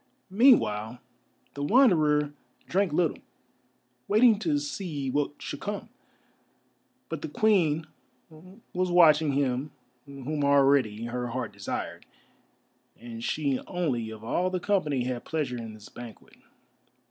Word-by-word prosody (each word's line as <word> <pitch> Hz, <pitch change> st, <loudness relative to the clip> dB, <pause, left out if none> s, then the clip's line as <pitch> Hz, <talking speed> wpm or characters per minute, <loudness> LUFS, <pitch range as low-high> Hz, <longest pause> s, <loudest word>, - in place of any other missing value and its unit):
Meanwhile 125 Hz, -, +3 dB, 0.6 s
the 140 Hz, -, -6 dB
Wanderer 150 Hz, -, +3 dB, 0.3 s
drank 195 Hz, -1 st, +1 dB
little, 160 Hz, +1 st, +1 dB, 0.9 s
waiting 215 Hz, 0 st, +5 dB
to 295 Hz, +5 st, 0 dB
see 180 Hz, -, -4 dB
what 145 Hz, +1 st, -1 dB
should 145 Hz, -, -6 dB
come. 205 Hz, +2 st, -5 dB, 1.2 s
But -, -, -5 dB
the -, -, -4 dB
Queen 165 Hz, -8 st, +2 dB, 0.9 s
was 185 Hz, 0 st, 0 dB
watching 160 Hz, -4 st, +5 dB
him 135 Hz, 0 st, 0 dB, 0.4 s
whom 140 Hz, +2 st, -4 dB
already 135 Hz, -6 st, +3 dB
her 125 Hz, +1 st, -3 dB
heart 125 Hz, -3 st, -4 dB
desired, 100 Hz, 0 st, -5 dB, 0.9 s
and 115 Hz, -1 st, -8 dB
she 140 Hz, -2 st, 0 dB
only 135 Hz, -11 st, -2 dB
of 110 Hz, -1 st, -10 dB
all 175 Hz, +10 st, 0 dB
the 185 Hz, 0 st, -2 dB
company 165 Hz, -10 st, 0 dB
had 125 Hz, -1 st, -3 dB
pleasure 145 Hz, -6 st, -2 dB
in 115 Hz, -2 st, -7 dB
this 105 Hz, -1 st, -13 dB
banquet. 120 Hz, -2 st, -12 dB
145 Hz, 120 wpm, -27 LUFS, 125-180 Hz, 1.2 s, waiting